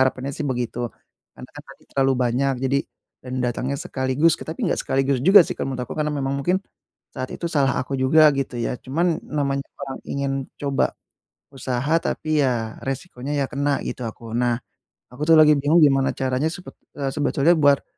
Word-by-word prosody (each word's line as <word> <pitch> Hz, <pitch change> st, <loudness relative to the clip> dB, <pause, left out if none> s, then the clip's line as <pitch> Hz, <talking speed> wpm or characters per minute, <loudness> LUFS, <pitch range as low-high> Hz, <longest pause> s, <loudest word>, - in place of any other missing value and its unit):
harapannya 130 Hz, +1 st, 0 dB
sih 145 Hz, 0 st, -3 dB
begitu. 120 Hz, -1 st, -2 dB, 0.5 s
Karena -, -, -10 dB
kan -, -, -9 dB
tadi -, -, -15 dB
terlalu 135 Hz, -1 st, +2 dB
banyak, 130 Hz, +3 st, +1 dB
jadi 135 Hz, +1 st, +2 dB, 0.4 s
dan 125 Hz, 0 st, -7 dB
datangnya 125 Hz, +3 st, -2 dB
sekaligus, 130 Hz, +4 st, +1 dB
tapi 160 Hz, -, -4 dB
nggak -, -, 0 dB
sekaligus 135 Hz, -1 st, 0 dB
juga 190 Hz, +6 st, +8 dB
sih -, -, -4 dB
kalau 135 Hz, -1 st, -4 dB
menurut 125 Hz, -, -3 dB
aku. -, -, -8 dB
Karena 150 Hz, -, +1 dB
memang 140 Hz, -2 st, -2 dB
mungkin, 180 Hz, +6 st, +2 dB, 0.6 s
saat 130 Hz, 0 st, -4 dB
itu -, -, -8 dB
salah 135 Hz, -4 st, +3 dB
aku 135 Hz, -, -6 dB
juga 150 Hz, +3 st, +6 dB
gitu 135 Hz, -3 st, -3 dB
ya. 120 Hz, +1 st, -3 dB
Cuman, 165 Hz, +5 st, 0 dB
namanya 140 Hz, -2 st, -1 dB, 0.2 s
orang 135 Hz, -1 st, -6 dB
ingin 140 Hz, -1 st, -2 dB, 0.3 s
coba 140 Hz, -2 st, 0 dB, 0.6 s
usaha, 130 Hz, +3 st, -2 dB
tapi 155 Hz, -2 st, 0 dB
ya, 115 Hz, -4 st, -1 dB
resikonya 135 Hz, 0 st, -5 dB
ya 140 Hz, -, +1 dB
kena 140 Hz, 0 st, 0 dB
gitu 125 Hz, -, -5 dB
aku. 115 Hz, 0 st, -6 dB
Nah, 120 Hz, -1 st, +1 dB, 0.5 s
aku 135 Hz, -, -8 dB
tuh 165 Hz, -, +7 dB
lagi 150 Hz, -1 st, +7 dB
bingung 155 Hz, +4 st, +4 dB
gimana 135 Hz, -2 st, +2 dB
caranya 130 Hz, +3 st, 0 dB
sepet 180 Hz, +2 st, -8 dB, 0.2 s
e 135 Hz, -2 st, -2 dB
sebetulnya 150 Hz, +1 st, +2 dB
buat 145 Hz, -2 st, +4 dB
135 Hz, 180 wpm, -23 LUFS, 130-150 Hz, 0.6 s, juga